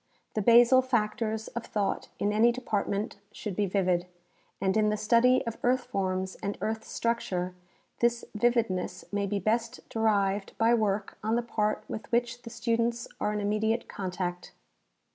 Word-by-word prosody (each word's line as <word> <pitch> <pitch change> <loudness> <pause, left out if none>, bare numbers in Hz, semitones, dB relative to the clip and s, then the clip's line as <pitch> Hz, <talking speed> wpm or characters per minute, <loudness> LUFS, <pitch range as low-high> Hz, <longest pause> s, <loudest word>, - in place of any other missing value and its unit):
The 215 - 0
basal 240 +4 +7
factors 220 -3 -1
of 235 - -5
thought 205 -2 -2
in 205 +1 0
any 225 +3 +5
department 210 -4 -2
should 210 -4 -5
be 205 0 +1
vivid, 180 -2 +1 0.5
and 190 -1 +1
in 215 -1 +3
the 210 - 0
study 235 +4 +4
of 230 -1 -5
earth 250 +1 +2
forms 190 -5 -2
and 200 0 -3
earth 220 0 -2
structure 185 -6 -2 0.5
this 235 0 +1
vividness 225 -4 0
may 200 0 0
be 205 +1 -1
best 230 +5 -1
derived 205 -3 +1
by 225 +1 +4
work 210 -3 0
on 220 +2 +1
the 240 - +1
part 215 -2 -1
with 220 - -7
which 240 +1 0
the 230 - -9
students 235 0 0
are 210 - 0
in 210 - -2
immediate 215 +3 0
contact. 180 -2 -4
215 Hz, 160 wpm, -29 LUFS, 200-235 Hz, 0.5 s, basal